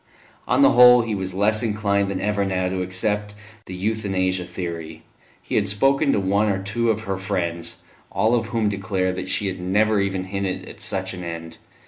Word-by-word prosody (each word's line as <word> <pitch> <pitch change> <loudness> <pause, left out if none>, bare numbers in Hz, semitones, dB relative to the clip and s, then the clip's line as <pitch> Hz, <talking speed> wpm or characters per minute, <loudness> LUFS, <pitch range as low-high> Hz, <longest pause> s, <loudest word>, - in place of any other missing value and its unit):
On 280 - +3
the 275 - +7
whole, 125 -1 +8
he 115 -1 -3
was 95 -2 -4
less 105 +2 +2
inclined 100 -3 0
than 95 -1 -2
ever 105 -1 0
now 95 -1 -1
to 95 0 -2
accept 105 +3 -1 0.3
the 90 - -6
Euthanasia 95 -3 -1
theory; 85 -3 -6 0.4
he - - -7
had 100 -1 +2
spoken 135 +8 +2
to - - +2
one 100 +2 +1
or 100 - +1
two 105 +5 -1
of 110 -1 0
her 95 -3 -3
friends, 85 -4 -3 0.3
all 110 +5 +2
of 120 - +1
whom 115 -2 0
declared 95 -2 -1
that 95 - -5
she 105 - 0
had 95 -1 -3
never 105 +3 +2
even 95 -1 -1
hinted 95 0 -3
at - - -11
such 95 0 -2
an 90 -1 -7
end. 85 -1 -7
100 Hz, 195 wpm, -22 LUFS, 95-105 Hz, 0.4 s, whole